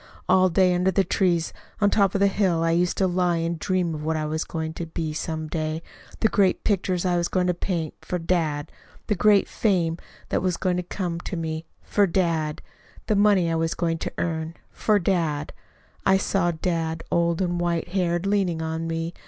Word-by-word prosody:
All 185 0 +5
day 180 +1 +3
under 180 +1 +2
the 195 +1 +2
trees 175 -4 +1 0.3
up 205 -2 +3
on - - +2
the 200 - +4
hill, 190 -4 +2
I 165 - +2
used 175 +1 +1
to 190 - +3
lie 180 -1 +1
and 165 0 -2
dream 180 -2 0
of 150 -1 -5
what 160 +1 0
I 155 - -1
was 155 +1 -1
going 160 -1 -4
to 170 0 -5
be 160 -1 -3
some 160 0 -3
day 155 0 -3 0.4
the 220 - +5
great 195 -3 +2
pictures 185 -3 0
I 180 -1 +2
was 170 0 +1
going 185 -1 0
to 180 - +2
paint 170 -3 -3
for 180 - -3
dad. 165 -4 -1 0.3
The 210 - +1
great 205 +1 +4
fame 175 -6 0 0.3
that - - 0
was 180 -2 0
going 180 -1 0
to - - 0
come 175 -1 -4
to 175 - -5
me 160 0 -3 0.2
for 205 -1 +2
dad. 165 -4 0 0.4
The 215 - +1
money 200 -4 +4
I - - +1
was 165 0 0
going 165 -1 -1
to - - -3
earn 160 -1 -2 0.2
for 215 -1 +2
dad: 165 -6 0 0.5
I 190 0 +4
saw 190 -2 +1
dad, 165 -1 -2
old 170 -1 +2
and 175 -2 0
white 170 0 -1
haired, 175 -1 0
leaning 195 -5 +1
on 160 0 -3
me. 165 +1 -3
175 Hz, 200 wpm, -24 LUFS, 165-185 Hz, 0.5 s, All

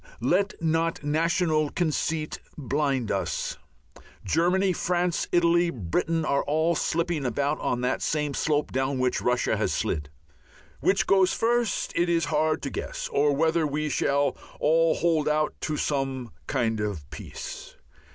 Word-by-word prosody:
Let 195 +2 +2
not 165 0 0
national 155 0 +1
conceit 160 -1 -1 0.2
blind 140 -3 0
us. - - -2 0.7
Germany, 185 +3 +2
France, 175 0 0
Italy, 175 0 +3
Britain 155 - -1
are 140 -1 +2
all 160 +3 +2
slipping 165 -1 -1
about 140 +4 0
on 125 - -1
that 125 +1 0
same 150 -2 -1
slope 150 +1 0
down 130 +1 0
which 130 0 0
Russia 125 0 +1
has - - 0
slid. 75 -2 -2 0.7
Which 195 - +2
goes 190 -1 +4
first, 235 -2 0
it 175 +1 +2
is 170 -1 +2
hard 155 +1 +1
to 140 - -3
guess, - - -4
or 145 0 +3
whether 160 +1 +2
we 150 +1 -2
shall 140 +1 +1 0.2
all 165 +1 +3
hold 160 -3 +1
out 150 0 +1
to 155 -1 -2
some 135 -5 -2 0.2
kind 115 -2 0
of 100 -9 -3
Peace. - - -8
155 Hz, 140 wpm, -26 LUFS, 140-170 Hz, 0.7 s, goes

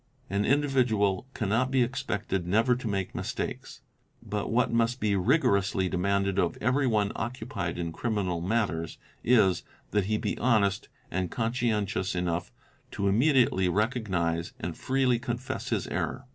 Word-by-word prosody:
An 100 +1 +1
individual 125 -8 +2
cannot 115 +4 +1
be 130 -2 +3
expected 105 -8 -2
never 115 +6 +3
to 125 -1 -5
make 95 -3 -2
mistakes, - - -5 0.4
but 105 0 -3
what 120 +1 +2
must 115 +2 +1
be 105 -2 +1
rigorously 95 0 +2
demanded 100 +1 0
of 90 -3 +1
every 130 +1 +2
one 105 -4 +2
occupied 105 -7 -4
in 85 -1 -3
criminal 95 -4 -1
matters 90 -5 -1 0.3
is, 100 -8 +4 0.3
that 105 -2 +1
he 110 +2 0
be - - -3
honest 105 -5 +2 0.2
and 90 0 -1
conscientious 110 -5 -1
enough 90 -1 -1 0.4
to 100 - -2
immediately 115 -4 +3
recognise 95 -6 0
and 85 -1 -4
freely 130 -2 +1
confess 120 +1 -4
his - - 0
error. 130 - -3
105 Hz, 140 wpm, -28 LUFS, 95-120 Hz, 0.4 s, is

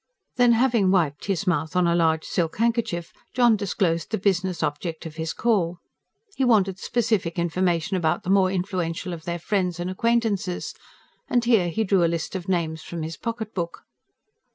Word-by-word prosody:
Then, 245 -1 +5
having 230 -5 +3
wiped 160 -7 +1
his 195 -1 -1
mouth 160 -3 0
on 180 -1 +3
a 170 - +3
large 160 -2 +2
silk 165 -2 -1
handkerchief, 230 -7 0 0.2
John 240 -3 +5
disclosed 185 -4 -1
the 220 - -1
business 185 -3 0
object 155 +3 -3
of 160 0 -8
his 160 0 -2
call. 185 -7 +1 0.6
He 270 - 0
wanted 200 -6 +3
specific 220 -8 0
information 175 0 0
about 160 -4 0
the 185 - -1
more 195 -1 +4
influential 180 -1 -2
of 165 -1 -8
their 170 0 -2
friends 180 -1 -1
and 175 +1 -2
acquaintances; 210 -3 0 0.6
and 245 -1 +2
here 220 -8 +3
he 220 +6 0
drew 190 -3 +3
a - - +4
list 170 +2 -3
of 185 0 -5
names 160 -3 -1
from 170 -2 -6
his 160 +1 -5
pocket 230 +3 -5
book. 170 -2 -4
180 Hz, 175 wpm, -24 LUFS, 170-210 Hz, 0.6 s, Then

